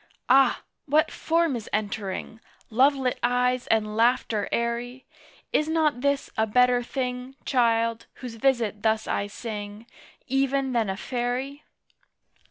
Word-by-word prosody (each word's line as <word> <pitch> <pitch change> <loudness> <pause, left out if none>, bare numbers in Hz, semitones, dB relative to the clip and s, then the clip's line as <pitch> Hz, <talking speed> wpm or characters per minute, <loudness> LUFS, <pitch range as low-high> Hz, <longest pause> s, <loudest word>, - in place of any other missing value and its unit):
Ah! 270 +2 +5 0.2
What 300 +2 +3
form 330 -3 +1
is 225 -3 -6
entering? 210 0 -3 0.3
Lovelit 265 +2 +2
eyes 250 +1 +1
and 215 -1 +1
laughter 230 -2 +1
airy! 240 +2 -2 0.5
Is 305 - +2
not 310 -5 +1
this 280 0 0
a 220 0 +1
better 250 +2 +4
thing, 250 +1 -4
Child, 230 -3 +1
whose 250 -3 -8
visit 230 -3 0
thus 220 -1 +1
I 200 - -1
sing, 210 0 -7 0.4
Even 270 0 0
than 225 -4 +1
a 190 - -3
Fairy? 255 +5 -3
245 Hz, 125 wpm, -26 LUFS, 220-265 Hz, 0.5 s, Ah